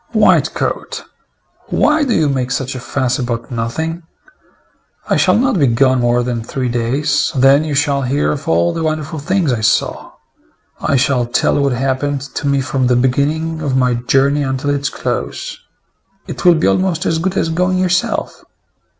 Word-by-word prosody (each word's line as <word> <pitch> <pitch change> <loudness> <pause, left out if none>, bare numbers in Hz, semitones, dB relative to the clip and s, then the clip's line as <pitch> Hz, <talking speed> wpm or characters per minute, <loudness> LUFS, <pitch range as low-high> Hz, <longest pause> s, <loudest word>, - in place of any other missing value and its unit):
"White - - +3
coat, - - -3 0.6
why 300 0 +2
do 255 -5 0
you 160 -2 +2
make 130 -3 -1
such 130 0 -2
a 130 - -6
fuss 130 +1 -1
about 120 -1 -4
nothing? 160 +9 -3 1.1
I - - +2
shall - - +3
not 250 -5 +1
be 140 - +4
gone 130 +2 +2
more 120 0 +2
than 120 -2 -3
three 125 +2 -3
days; 135 +6 0
then 135 +3 +5
you 155 -2 -3
shall 140 -1 +1
hear 140 +3 0
of 145 -1 -5
all 85 +1 +2
the - - -3
wonderful 155 0 -2
things 165 -2 0
I 115 - -2
saw. 110 - 0 0.7
I 140 - +1
shall 125 -2 +1
tell 120 - +1
what 140 -2 +1
happened 135 +2 -1
to 145 - -3
me 140 -1 +2
from 130 -1 -1
the 125 - +3
beginning 150 +6 0
of 140 -4 -1
my 125 -1 +2
journey 135 +4 +1
until 135 +1 -1
its 140 0 -1
close. - - -4 0.7
It - - -7
will 175 -1 +7
be 160 - 0
almost 185 -3 +1
as 160 0 0
good 190 +3 -2
as 165 - +1
going 180 +3 0
yourself." 185 0 -1
140 Hz, 175 wpm, -16 LUFS, 125-160 Hz, 1.1 s, will